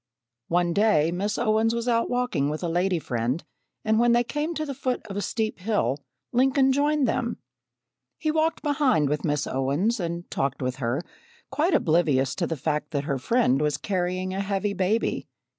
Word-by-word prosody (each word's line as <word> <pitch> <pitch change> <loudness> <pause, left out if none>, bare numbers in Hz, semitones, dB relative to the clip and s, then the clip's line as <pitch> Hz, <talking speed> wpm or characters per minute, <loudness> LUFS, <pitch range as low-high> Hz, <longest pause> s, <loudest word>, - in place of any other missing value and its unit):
One 175 0 +1
day 170 -6 +3
Miss 200 +4 -1
Owens 225 0 +2
was 235 +1 -3
out 230 -1 +2
walking 245 - 0
with 155 +4 -4
a - - 0
lady 175 +2 +1
friend 125 0 -2 0.4
and 220 0 +3
when 240 0 +4
they 240 0 +4
came 300 +6 -3
to 310 - -2
the 280 - -4
foot 255 -2 -2
of 200 -3 -7
a 205 - -1
steep 220 0 -2
hill, 180 - 0 0.3
Lincoln 265 +2 +4
joined 290 0 +2
them. 235 +1 -1 0.8
He 310 - 0
walked 315 +1 0
behind 275 - +2
with 150 0 -1
Miss 145 -2 0
Owens, 145 - 0
and 170 0 -4
talked 135 -1 -1
with 130 -1 -2
her, 130 +4 -1 0.5
quite 300 +5 +2
oblivious 155 - +2
to 170 - 0
the 165 - -3
fact 150 +2 -2
that 145 -3 -2
her 140 -3 -2
friend 150 - +2
was 150 -1 +1
carrying 185 -1 -2
a 195 - -1
heavy 200 +1 -1
baby. 195 +4 0
195 Hz, 185 wpm, -25 LUFS, 150-240 Hz, 0.8 s, when